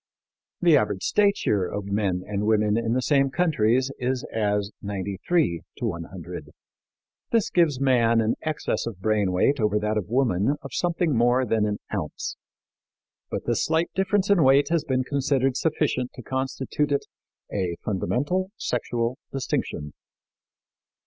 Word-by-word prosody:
The 170 -4 +6
average 105 -6 -1
stature 200 - +2
of 105 -1 -4
men 100 -3 -1
and 105 0 -2
women 105 -1 +3
in 115 0 0
the 130 +1 0
same 140 -1 +3
countries 130 -6 +2
is 125 0 -1
as 105 -2 0
93 100 - -1 0.2
to - - -3
100. 85 -4 -6 0.8
This 230 -3 +2
gives 160 -7 +3
man 120 -4 +3
an 110 0 +2
excess 155 -5 -2
of 110 -5 -6
brain 105 -2 +1
weight 135 +10 +2
over 105 -1 +2
that 105 0 0
of 95 - -7
woman 120 0 +2
of 135 -3 -8
something 170 -4 0
more 120 +2 +3
than 110 -2 +1
an 105 0 -1 0.2
ounce. 90 -8 -3 0.9
But - - -4
this - - +1
slight 160 +2 +1
difference 195 +1 +1
in 195 -4 +5
weight 135 +2 +5
has 165 -3 +2
been 130 -4 0
considered 135 -1 +1
sufficient 145 -5 0
to 125 - -10
constitute 135 +3 -2
it 140 - +1 0.5
"a 90 -4 -1
fundamental 145 - 0
sexual 120 +1 -2
distinction." 100 - -3
120 Hz, 145 wpm, -25 LUFS, 105-140 Hz, 0.9 s, The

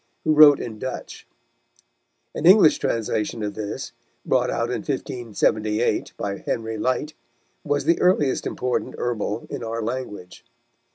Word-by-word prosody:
who 155 - +3
wrote 150 -2 +8
in 110 -3 -6
Dutch. 130 +2 -7 1.1
An 165 - 0
English 185 -4 +7
translation 110 -1 -2
of 105 -1 -3
this, 105 -2 -5 0.3
brought - - +2
out - - -1
in - - -1
1578, 110 -2 -1
by 100 -1 -3
Henry 115 -1 -3
Lyte, 145 +6 -1 0.5
was 145 -1 -1
the 170 +2 +2
earliest 155 -7 +2
important 125 0 -2
Herbal 115 -2 -2
in - - -5
our 115 0 -3
language. 110 -6 -6
120 Hz, 130 wpm, -23 LUFS, 110-145 Hz, 1.1 s, wrote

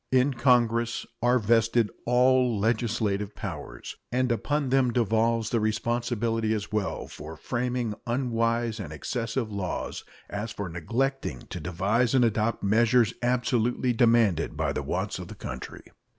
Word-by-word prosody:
In 130 +2 +3
Congress 120 -2 +2 0.2
are 120 +2 +4
vested 115 0 +2 0.2
all 125 -1 +4
legislative 105 -2 0
powers, - - -7 0.2
and 125 0 +1
upon 145 +4 0
them 130 -1 +3
devolves 115 -1 +1
the 115 - +2
responsibility 115 0 0
as 105 -1 -5
well 105 -2 -2
for 80 +2 -9
framing 120 - -2
unwise 115 -2 0
and 85 -8 -6
excessive 115 - -3
laws 100 -3 -4 0.2
as 105 +3 -4
for 100 -3 -5
neglecting 115 - -2
to 90 - -4
devise 100 - +1
and 125 -2 +5
adopt 110 0 0
measures 115 +3 +3
absolutely 120 0 +1
demanded 115 -8 +3
by - - 0
the - - -2
wants - - -2
of - - -7
the - - -9
country. - - -7
115 Hz, 135 wpm, -27 LUFS, 105-125 Hz, 0.2 s, and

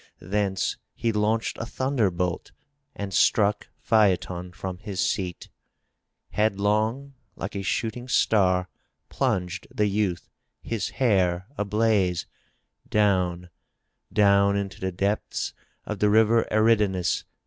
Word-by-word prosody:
Thence 95 +1 -1 0.2
he 115 - 0
launched 110 +1 0
a - - -3
thunderbolt 100 -11 -1 0.4
and 100 -1 -5
struck 105 -1 +3
Phaeton 90 -4 +1
from 95 0 -6
his 100 -2 -6
seat. 90 0 -1 0.8
Head 105 0 +1
long, 110 +7 0 0.2
like 100 +3 -6
a 100 - -2
shooting 115 +5 -2
star, 95 -7 +2 0.4
plunged 90 -1 -1
the 105 - 0
youth, 100 -3 -1 0.4
his 115 -4 -2
hair 95 -7 +2
ablaze, 105 -5 +1 0.6
down, 90 -4 +1 0.6
down 100 -1 +4
into 100 -2 -4
the 95 0 -2
depths 100 +4 -2 0.3
of 105 -2 -5
the 105 - +3
river 110 +2 +4
Eridanus. 105 -4 +2
100 Hz, 110 wpm, -25 LUFS, 95-110 Hz, 0.8 s, down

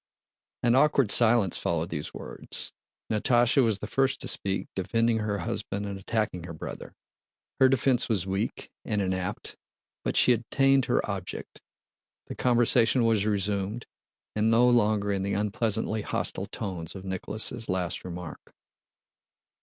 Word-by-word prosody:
An 120 0 +4
awkward 135 -4 +4
silence 110 -6 +3
followed 85 0 -1
these 75 -4 -4
words. - - -7 0.4
Natásha 120 +4 +3
was 110 -4 +2
the - - -6
first 135 0 +1
to - - -3
speak, 95 0 -1
defending 115 +4 +1
her 105 -1 -1
husband 100 0 -3
and 100 -1 -5
attacking 95 -4 -2
her 85 - -7
brother. 80 - -8 0.6
Her 130 - +6
defense 130 -1 +2
was 100 -5 +1
weak 95 +4 -3
and 105 -3 -1
inapt 95 -2 -3 0.5
but - - -1
she 125 - +6
attained 135 +3 +2
her - - +1
object. - - -6 0.6
The - - -7
conversation 120 0 +3
was 110 -2 +2
resumed, 100 +2 -1 0.5
and 110 +1 +2
no 115 +2 +5
longer 105 -4 +3
in 100 -1 -1
the 100 +1 -1
unpleasantly 110 +1 -1
hostile - - -2
tone 90 -5 -5
of 95 0 -8
Nicholas' 105 +4 -3
last 90 -2 -1
remark. 90 -3 -8
105 Hz, 140 wpm, -27 LUFS, 95-120 Hz, 0.6 s, Her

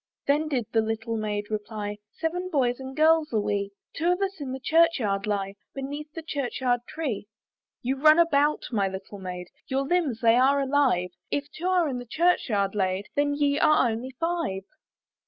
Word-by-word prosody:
Then 295 +3 +2
did 260 -6 -1
the 225 - +3
little 225 +1 -2
Maid 210 -1 -3
reply, 210 -1 -4 0.2
"Seven 355 +3 -2
boys 255 -6 +1
and 265 +1 -8
girls 315 0 +4
are 220 - +3
we; 205 -1 -1 0.3
"Two 335 +2 +2
of 360 - 0
us 390 -4 -2
in 270 -2 -4
the 265 - -4
church 330 +4 +4
yard 200 -4 -1
lie, 195 -2 -1 0.2
"Beneath 290 +3 -5
the 330 - -6
church 280 -5 -3
yard 245 -2 +2
tree." 265 -11 -4 0.6
"You 265 +2 0
run 310 +1 +7
about, 300 -3 +3
my 200 -4 +1
little 190 +1 -7
maid, 180 -1 -6 0.2
"Your 270 0 0
limbs 290 -7 0
they 230 0 +5
are 275 +3 +4
alive; 265 -10 +2 0.2
"If 290 0 -2
two 345 +4 -4
are 365 -3 +3
in 255 -3 -3
the 245 - -9
church 340 +2 +2
yard 200 -3 +1
laid, 190 -1 -1
"Then 285 0 +2
ye 285 0 +1
are 305 -5 +5
only 235 +4 -4
five." 330 - -1
265 Hz, 190 wpm, -26 LUFS, 210-305 Hz, 0.6 s, run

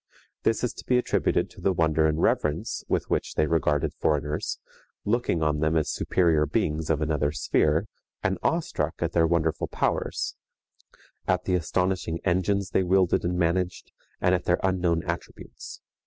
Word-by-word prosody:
This 115 - +1
is 125 -1 0
to - - -10
be 125 - +3
attributed 125 - +1
to - - -14
the 95 - +2
wonder 80 -2 +2
and 75 0 0
reverence 75 -2 0
with - - 0
which - - -1
they 75 - +3
regarded 75 -2 +1
foreigners, 75 0 -1 0.5
looking 105 -7 +1
on 75 -1 +1
them 80 +1 +2
as 75 -2 0
superior 80 -4 +2
beings 75 +1 -1
of 80 -2 +1
another 75 -2 0
sphere, 75 - +1 0.4
and - - 0
awestruck - - -1
at - - -1
their 80 -1 +3
wonderful 80 -1 0
powers, - - -1 0.9
at 90 0 +1
the 95 - -1
astonishing 90 -1 0
engines 95 +2 +1
they - - +3
wielded 95 -1 +2
and 90 +1 -1
managed, 90 +1 -1 0.3
and 90 - +3
at 90 - 0
their 90 - +2
unknown 90 -3 +1
attributes. - - -7
85 Hz, 160 wpm, -26 LUFS, 80-90 Hz, 0.9 s, be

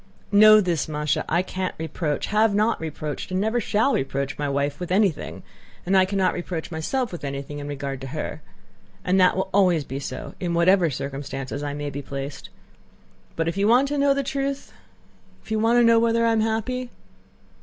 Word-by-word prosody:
"Know 215 +1 +8
this, 175 -6 -1
Másha: 150 -1 -1
I 170 +3 +2
can't 185 0 -4
reproach, 160 -1 -2
have 215 0 +2
not 215 0 +1
reproached, 155 -2 -5
and 185 0 -1
never 220 +4 0
shall 220 +6 +1
reproach 135 0 -2
my 145 -1 -2
wife 140 +1 -1
with 180 0 -5
anything, 195 -4 0 0.4
and 190 +2 +1
I 190 -1 +6
cannot 190 -1 +1
reproach 175 -2 -5
myself 230 +11 -2
with 175 - -8
anything 140 +1 -5
in 145 - -6
regard 140 -2 -5
to 135 - -6
her; 155 +2 -5 0.6
and 185 +1 +3
that 180 - +5 0.2
always 180 -6 +3
will - - -24
be 135 +2 -3
so 130 -2 -6
in 175 -2 -2
whatever 175 0 +4
circumstances 135 0 -5
I 145 -1 -3
may 145 0 -4
be 140 - -5
placed. 140 0 -7 0.9
But 165 0 -1
if 165 - -2
you 200 +1 +2
want 250 +5 +4
to 290 - -1
know 280 0 +3
the 280 - 0
truth... 275 +1 -3 0.7
if - - -13
you 220 - +1
want 230 +2 +3
to 240 - +5
know 230 0 +6
whether 230 0 +2
I 230 - +3
am 225 -1 +2
happy? 225 +3 -2
180 Hz, 195 wpm, -24 LUFS, 145-220 Hz, 0.9 s, Know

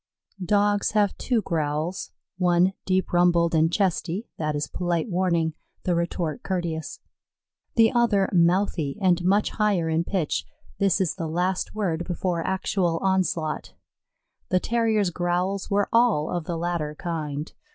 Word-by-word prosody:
Dogs 205 +2 +2
have 205 -2 +2
two 235 -5 0
growls: 160 +1 -2 0.3
one 180 +1 +3
deep 185 -1 0
rumbled, 175 -1 +3
and 160 0 +3
chesty; 190 +1 -1
that 155 -1 -1
is 145 0 -1
polite 175 +3 -2
warning 170 -3 +1 0.3
the 180 - +1
retort 170 -2 -2
courteous; 170 -4 -3 0.8
the 225 -1 +5
other 230 -6 +3
mouthy 170 -4 +2
and 180 -3 +2
much 200 +4 +2
higher 200 -7 +1
in 160 +1 +1
pitch: 175 -4 -1 0.4
this 195 -2 +2
is 185 -4 +1
the 165 -3 -3
last 180 +5 -1
word 175 -6 -1
before 175 -1 -2
actual 190 -2 0
onslaught. 185 -5 -1 0.7
The 185 - +3
Terrier's 220 -3 +1
growls 180 +3 -1
were 205 0 +2
all 230 -10 +3
of 175 -3 -2
the 170 0 -3
latter 165 -3 -2
kind. 150 -3 -4
175 Hz, 140 wpm, -25 LUFS, 165-195 Hz, 0.8 s, the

